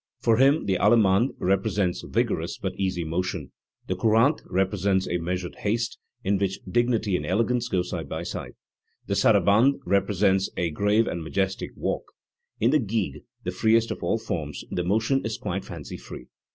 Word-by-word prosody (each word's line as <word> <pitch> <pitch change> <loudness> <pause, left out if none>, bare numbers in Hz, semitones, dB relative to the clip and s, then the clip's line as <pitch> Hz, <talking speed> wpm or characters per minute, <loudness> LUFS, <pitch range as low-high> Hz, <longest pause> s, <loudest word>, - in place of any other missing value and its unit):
For 115 -1 +3
him 140 +5 +4
the 95 -2 +1
allemande 110 +1 +4
represents 95 -1 0
vigorous - - -1
but - - -3
easy 95 -3 -1
motion; 85 +4 -3 0.3
the 95 - -2
courante 115 - +3
repre 95 +2 +1
sents 95 0 +1
a 90 - -1
measured 90 +1 -3
haste, 115 +3 -1 0.2
in 100 -2 +1
which 95 -1 -1
dignity 115 -2 +1
and - - -1
elegance 115 +5 +1
go 90 -6 0
side 85 -5 -5
by - - -4
side; - - -6 0.5
the - - -2
sarabande 115 +8 +4
represents 95 0 +2
a 85 -2 0
grave 105 +7 +2
and 85 -5 -3
majestic 95 +4 -2
walk; - - -3 0.5
in 115 +4 +3
the 155 - +4
gigue, 110 -4 -2 0.2
the 90 - -2
freest 110 +4 +2
of - - -5
all - - +1
forms, 80 -10 -4
the 90 - -1
motion 110 +8 +1
is 110 0 -3
quite 95 +2 -3
fancy - - -7
free. 60 - -10
100 Hz, 170 wpm, -25 LUFS, 90-115 Hz, 0.5 s, him